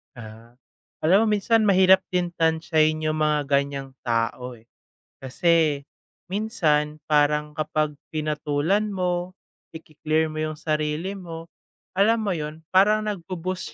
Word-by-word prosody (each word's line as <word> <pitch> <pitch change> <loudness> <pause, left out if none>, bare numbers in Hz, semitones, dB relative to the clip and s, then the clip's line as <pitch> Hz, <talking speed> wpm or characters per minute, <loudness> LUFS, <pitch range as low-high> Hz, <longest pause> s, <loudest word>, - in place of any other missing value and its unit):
Ah, 115 +1 -12 0.5
alam 195 +7 +4
mo 210 - +3
minsan 220 +1 +2
mahirap 190 -1 +6
din 180 -1 -1
tantiyahin 160 -1 +2
yung 155 0 -1
mga 150 -2 0
ganiyang 140 -1 0
tao, 120 +1 -2
eh. 110 - -20 0.5
Kasi 150 +2 +1 0.5
minsan, 155 -8 0
parang 150 0 +2
kapag 155 -1 -1 0.2
pinatulan 155 +7 -1
mo, 180 -1 -2 0.4
iki-clear 160 0 -2
mo 155 - -8
yung 155 0 -2
sarili 155 +4 -2
mo, 165 -2 -9 0.5
alam 220 +3 +3
mo 210 - -2
'yon? 155 +1 -6
Parang, 210 +3 +4
nagbo-boost 185 -1 -5
155 Hz, 120 wpm, -24 LUFS, 150-185 Hz, 0.5 s, mahirap